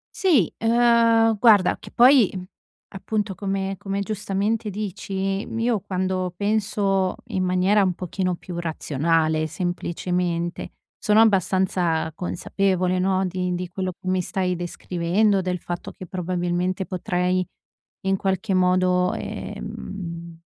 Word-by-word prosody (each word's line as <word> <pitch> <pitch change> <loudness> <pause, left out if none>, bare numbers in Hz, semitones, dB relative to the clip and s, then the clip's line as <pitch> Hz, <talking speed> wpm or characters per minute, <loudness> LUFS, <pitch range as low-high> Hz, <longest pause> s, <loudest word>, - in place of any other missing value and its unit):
Sì, 300 - +3
uhm, 230 -1 +4
guarda 205 -6 +5
che - - -11
poi, 250 -3 +6
mhmm, 185 -1 -6 0.4
appunto 205 +1 -3
come 195 0 -3
come 195 0 -3
giustamente 210 +2 -1
dici, 195 -1 -3
m - - -5
io 230 -1 +1
quando 185 -1 -2
penso 200 -2 0
in 190 -5 -1
maniera 185 +3 +3
un 185 -3 +1
pochino 185 0 -2
più 170 0 -7
razionale 160 0 0
semplicemente, 175 +1 -2 0.3
sono 210 +1 +3
abbastanza 185 -5 +2
consapevole, 185 +1 -1
no, 190 0 +1
di 180 0 -2
di 180 +1 -4
quello 185 0 -3
che 185 - -13
mi 185 0 +1
stai 180 0 -1
descrivendo, 180 +3 0
del 180 0 -2
fatto 175 0 -6
che 185 - -9
probabilmente 180 0 -2
potrei, 180 0 0 0.6
in 195 -1 +1
qualche 190 +2 -1
modo, 180 0 +3
ehm, 170 -3 -7
185 Hz, 125 wpm, -23 LUFS, 180-200 Hz, 0.6 s, poi